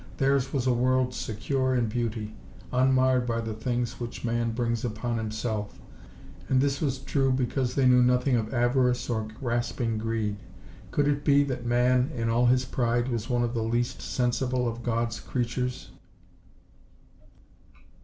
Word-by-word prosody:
Theirs 135 -1 +2
was 130 -3 -1
a 130 - +3
world 125 +1 +2
secure 130 +4 -1
in 120 -2 +2
beauty, 110 -1 -3 0.4
unmarred 130 -1 +3
by 115 -1 0
the 115 -1 -3
things 120 +2 -2
which 120 0 -6
man 115 0 0
brings 120 0 -1
upon 115 0 -2
himself, 110 -1 -3 0.7
and 130 - +3
this 140 +1 +1
was 135 -4 0
true 135 0 0
because 130 0 -1
they 135 - +3
knew 125 0 +6
nothing 125 +1 +3
of 110 -2 -1
avarice 125 0 +1
or 110 -2 -1
grasping 120 -2 -1
greed. 110 -2 -2 0.5
Could 145 +8 +1
it 145 0 0
be 140 0 +5
that 125 -3 -4
man, 125 +2 +3
in 115 -2 -1
all 120 +2 +3
his 125 +1 +3
pride, 120 0 0
was 115 -2 -3
one 120 -1 +1
of 120 0 -1
the 115 - -1
least 120 +3 -1
sensible 125 0 0
of 115 0 -4
God's 115 -2 -1
creatures? 125 +1 -3
120 Hz, 155 wpm, -27 LUFS, 115-130 Hz, 0.7 s, knew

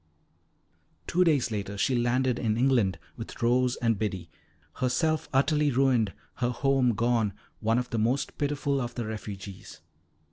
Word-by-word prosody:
Two 180 +1 +2
days 145 -8 +2
later, 100 -1 -4
she 130 - +1
landed 125 +1 +1
in 110 -2 0
England 120 -7 +2 0.2
with 115 - -8
Rose 125 +1 +3
and 115 -4 0
Biddy, 95 -6 -3 0.5
herself 155 +5 0
utterly 145 +2 +3
ruined, 125 -5 +2 0.3
her 120 - 0
home 130 -1 +2
gone, 115 -2 +1 0.3
one 115 +1 +1
of 125 0 -2
the 115 - 0
most 120 +6 0
pitiful 145 -1 0
of 120 -1 -5
the 120 - -3
refugees. 100 -3 -7
120 Hz, 145 wpm, -28 LUFS, 110-135 Hz, 0.5 s, Rose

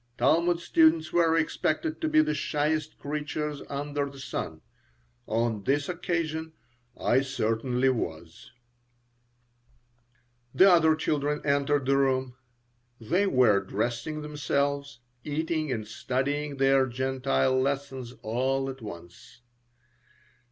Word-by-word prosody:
Talmud 170 +2 +3
students 160 -2 +3
were 165 -1 +3
expected 165 - -1
to 320 - 0
be 310 0 +5
the 310 0 0
shyest 155 +1 -1
creatures 150 0 -4
under 145 0 -2
the 140 - -13
sun. 135 - -5 0.7
On 110 -2 -1
this 140 +4 +1
occasion 165 -2 -3 0.5
I 130 - +3
certainly 125 0 0
was 85 -5 -4 2.1
The 195 0 +7
other 160 -2 +5
children 150 -1 -1
entered 140 -1 +1
the 135 +1 +3
room. 130 -2 +1 0.6
They 175 - +1
were 125 - +4
dressing 120 +10 -3
themselves, 140 -3 -2 0.2
eating 155 0 -2
and 110 -4 -3
studying 140 +6 -2
their 135 0 +4
Gentile 130 +1 0
lessons 135 -2 -3
all 135 +4 0
at 130 -1 -12
once. 85 +1 -11
140 Hz, 110 wpm, -27 LUFS, 130-155 Hz, 2.1 s, The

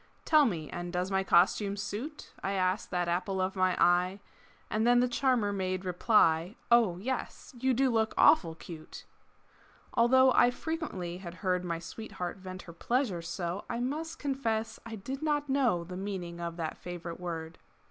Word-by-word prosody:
"Tell 310 -2 +6
me 165 - -2
and 175 0 -5
does 180 +2 -2
my 190 0 +2
costume 195 +3 +3
suit?" 210 +9 -5
I 195 - -1
asked 185 +1 0
that 180 -1 -1
apple 185 +3 -1
of 185 +1 -1
my 185 -1 +1
eye 180 +2 +3 0.5
And 220 +2 0
then 245 0 +6
the 250 - +3
charmer 245 -5 +1
made 185 -1 -2
reply, 180 -1 +3 0.2
"Oh, 225 -7 +5
yes, 255 +8 -4
you 260 0 +2
do 265 +1 +3
look 220 -1 +1
awful 165 - +5
cute!" 160 -1 -10 0.9
Although 260 +2 +5
I 245 - +5
frequently 245 - -4
had 175 -2 -8
heard 180 -1 +1
My 170 -2 -2
sweetheart 185 +1 -6
vent 185 -1 -8
her 170 - -11
pleasure 235 -1 0
so, 170 +3 -4
I 235 - -2
must 300 +6 -3
confess 230 -6 -2
I 225 - -6
did 260 +7 -6
not 295 -2 0
know 245 -11 +2
The 180 +1 -7
meaning 185 -3 -5
of 170 0 -4
that 160 -2 -4
favorite 175 -1 -7
word. 165 -2 -5
190 Hz, 170 wpm, -30 LUFS, 175-240 Hz, 0.9 s, Tell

